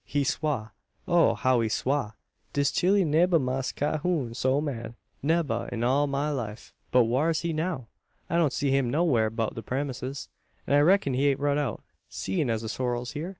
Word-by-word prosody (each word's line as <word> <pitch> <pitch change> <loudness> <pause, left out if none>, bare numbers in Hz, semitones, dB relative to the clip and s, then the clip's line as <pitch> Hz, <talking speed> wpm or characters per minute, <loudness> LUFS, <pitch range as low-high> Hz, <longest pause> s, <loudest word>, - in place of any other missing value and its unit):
He 145 -1 -1
swa; 135 -6 -1 0.4
oh! 165 -10 +4
how 125 +2 +2
he 110 - 0
swa! 130 -2 -1 0.4
Dis 140 -1 +2
chile 190 +1 +3
nebba 165 +3 +4
see 145 - -1
Mass 130 0 -1
Cahoon 150 -4 -1
so 130 +3 +1
mad 120 -6 -4 0.3
nebba, 150 -5 0
in 120 -1 -3
all 135 +4 +3
'im 140 - -4
life!" 135 -6 -3 0.2
"But 125 - +5
whar's 145 +8 +1
he 170 -1 -2
now? 155 -6 -2 0.4
I 170 - 0
don't 160 -5 +3
see 140 -2 0
him 135 -2 +2
nowhar' 130 -7 +2
beout 115 0 -2
the 115 - -6
premises; 135 +1 -4 0.4
an - - -1
I 145 - +6
reck'n 155 -2 +4
he 135 +3 +2
ain't 140 -1 +2
rud 145 0 +1
out, 135 -7 -3 0.3
seein' 95 +7 -2
as 115 -1 -1
the - - -4
sorrel's 125 0 -2
hyur?" 160 +5 -4
140 Hz, 195 wpm, -27 LUFS, 120-150 Hz, 0.4 s, I